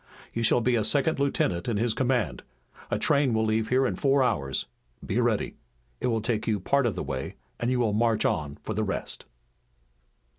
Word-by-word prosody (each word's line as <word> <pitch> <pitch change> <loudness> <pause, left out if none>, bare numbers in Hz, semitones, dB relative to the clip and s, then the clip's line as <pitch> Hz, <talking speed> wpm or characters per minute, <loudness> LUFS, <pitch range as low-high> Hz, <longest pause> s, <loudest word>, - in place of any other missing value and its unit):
You 115 - -2
shall 115 +1 +4
be 120 +1 +2
a 110 - +2
second 145 +7 +1
lieutenant 95 -11 0
in 115 -3 0
his 115 +1 +1
command. 125 -3 0 0.5
A - - 0
train 140 -5 +2
will 110 0 +2
leave 110 0 0
here 130 +1 +3
in - - 0
four 135 -1 +3
hours. 70 - -1 0.4
Be - - 0
ready. - - 0 0.4
It - - -1
will 115 -2 +1
take 110 -1 -1
you 110 -2 +1
part 140 +7 +2
of 105 - -1
the 90 - -3
way - - -4 0.2
and 120 - 0
you 125 -1 +1
will 110 -4 +2
march 115 0 +2
on 75 -2 -1
for 110 - -3
the 110 +1 0
rest." 100 - -3
115 Hz, 200 wpm, -27 LUFS, 110-130 Hz, 0.5 s, shall